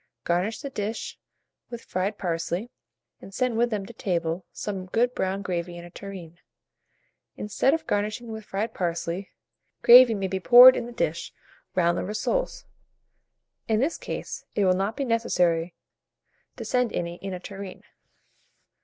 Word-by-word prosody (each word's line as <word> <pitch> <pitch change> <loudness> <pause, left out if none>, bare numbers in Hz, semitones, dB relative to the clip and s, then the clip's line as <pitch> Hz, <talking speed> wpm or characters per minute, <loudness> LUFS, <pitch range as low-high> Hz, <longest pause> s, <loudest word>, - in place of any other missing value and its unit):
Garnish 180 +6 -1
the 280 -2 -6
dish 215 -1 -4 0.5
with 235 -1 -8
fried 195 +3 -2
parsley, 175 +5 -3 0.5
and - - -11
send 250 -2 0
with 240 +1 +2
them 210 -4 -3
to 235 - -11
table 170 -4 -2
some 190 -3 -5
good 240 +6 +1
brown 195 -1 -2
gravy 175 -2 -3
in 170 - -9
a 175 - -13
tureen. 180 -4 -9 1.0
Instead 235 +7 +1
of 325 - -6
garnishing 210 +3 -2
with 220 0 -7
fried 210 +3 -3
parsley, 170 +1 -3 0.5
gravy 240 -1 +9
may 195 -1 -2
be 190 0 -2
poured 250 +5 +9
in 235 - -3
the - - -8
dish, 170 -8 -2 0.4
round 175 -1 +2
the - - -2
rissoles: 215 - -2 1.0
in 220 -2 +2
this 285 +7 0
case, - - -6
it 205 - +2
will 185 - +4
not 195 +5 -2
be 280 - -1
necessary 175 -8 +1 0.8
to - - -6
send 250 -2 +1
any 170 0 -3
in 195 +1 -6
a - - -7
tureen. 195 0 -9
200 Hz, 155 wpm, -26 LUFS, 180-230 Hz, 1.0 s, gravy